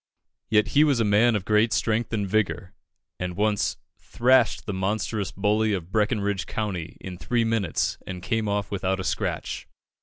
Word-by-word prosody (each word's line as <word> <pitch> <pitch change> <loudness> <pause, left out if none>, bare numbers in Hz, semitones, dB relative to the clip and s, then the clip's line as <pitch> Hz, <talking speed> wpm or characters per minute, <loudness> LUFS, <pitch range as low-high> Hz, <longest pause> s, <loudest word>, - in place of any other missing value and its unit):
Yet 105 -1 +3
he 145 - +5
was 145 -5 +2
a - - +3
man 110 +3 +4
of 100 -3 -2
great 110 +1 +3
strength 115 +1 0
and 105 -3 -1
vigour, 95 -2 -1 0.5
and 90 -1 -3
once 105 0 +1 0.2
"thrashed 120 -6 +2
the 100 - -3
monstrous 100 +1 -2
bully 105 +2 +1
of 90 -2 -4
Breckinridge 105 -4 0
County 95 -7 -4
in 90 -2 -8
three 120 -1 0
minutes, 110 -7 0
and 90 -1 -6
came 110 0 -1
off 100 -1 -1
without 95 -1 -1
a - - -3
scratch." - - -3
105 Hz, 170 wpm, -25 LUFS, 95-110 Hz, 0.5 s, he